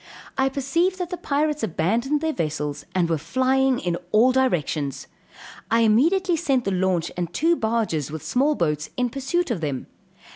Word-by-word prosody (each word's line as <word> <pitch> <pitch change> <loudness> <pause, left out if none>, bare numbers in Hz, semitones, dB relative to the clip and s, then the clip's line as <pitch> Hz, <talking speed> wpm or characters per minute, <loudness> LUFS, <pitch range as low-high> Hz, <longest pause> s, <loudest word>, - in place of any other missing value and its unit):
I 265 0 +2
perceived 335 +8 0
that 360 -1 -4
the - - -1
pirates 300 -1 -1
abandoned 225 - 0
their 320 -1 0
vessels, 150 - -3
and 180 -2 +2
were 165 -2 0
flying 260 - +2
in 175 -5 -2
all 235 +4 +5
directions. 155 - 0 0.6
I 230 0 +3
immediately 335 - +3
sent 270 -5 +1
the 195 - 0
launch 185 -2 0
and 175 -1 -3
two 330 - +2
barges 220 - -1
with 160 +1 -7
small 270 - +2
boats 150 - -1
in 250 -1 0
pursuit 275 +5 -1
of 195 -8 -2
them. 140 -4 -3
235 Hz, 170 wpm, -23 LUFS, 165-280 Hz, 0.6 s, all